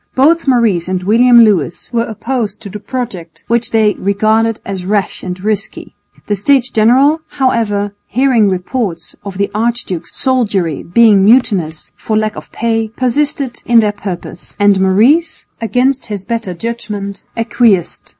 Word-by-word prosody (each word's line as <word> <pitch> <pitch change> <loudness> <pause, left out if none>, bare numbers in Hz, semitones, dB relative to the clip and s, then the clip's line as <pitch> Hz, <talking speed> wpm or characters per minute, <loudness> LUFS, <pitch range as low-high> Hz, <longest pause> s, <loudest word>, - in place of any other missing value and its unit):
Both 310 +5 +3
Maurice 225 -10 +2
and 185 -1 -2
William 235 +4 +5
Lewis 180 - -1
were 230 0 +1
opposed 225 -2 -4
to 200 - -7
the 210 - -7
project, 210 -10 -6
which 235 0 0
they 215 -2 +2
regarded 215 +3 +1
as 195 -2 -5
rash 200 +1 -1
and 180 0 -6
risky. 205 0 -3 0.3
The 205 - -1
States 255 +5 +2
General, 265 +8 +3 0.2
however, 210 -6 0
hearing 250 -5 +2
reports 185 -2 -3
of 195 -2 -7
the 200 0 -1
archduke's 215 -6 -3
soldiery 205 - 0
being 210 +1 +4
mutinous 195 -9 +2
for 215 - -2
lack 215 -1 -1
of - - -10
pay, 225 -1 -1
persisted 255 +2 -1
in 235 -1 +4
their 210 -2 +2
purpose, 190 -4 -8
and 205 -2 +3
Maurice, 250 - +2 0.2
against 255 +4 0
his 205 -3 -5
better 225 -5 -3
judgment, 210 -1 -5 0.2
acquiesced. 230 -5 +1
215 Hz, 145 wpm, -14 LUFS, 195-240 Hz, 0.3 s, William